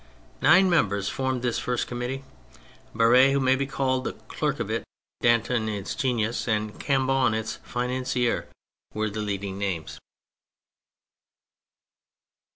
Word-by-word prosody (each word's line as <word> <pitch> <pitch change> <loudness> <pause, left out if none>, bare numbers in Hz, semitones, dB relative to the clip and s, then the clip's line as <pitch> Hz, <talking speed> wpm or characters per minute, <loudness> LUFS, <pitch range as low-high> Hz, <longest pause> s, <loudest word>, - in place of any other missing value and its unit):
Nine 185 +5 +6
members 100 - +2
formed 130 -2 -2
this 120 -2 0
first 125 -1 -1
Committee: 125 +2 -4 0.7
Barere, 125 +4 +6
who 140 - +2
may 130 0 +3
be 135 +1 -2
called 130 0 0
the - - -3
clerk - - -3
of - - -3
it, - - -1 0.4
Danton 120 -1 +2
its 100 -2 -4
genius, 120 -4 -1
and 105 -1 -1
Cambou 135 -2 +2
its 110 0 -4
financier, 125 0 -1 0.5
were 110 0 -1
the 110 +1 -4
leading 100 -2 -3
names. 95 -6 -3
120 Hz, 125 wpm, -26 LUFS, 110-130 Hz, 0.7 s, Nine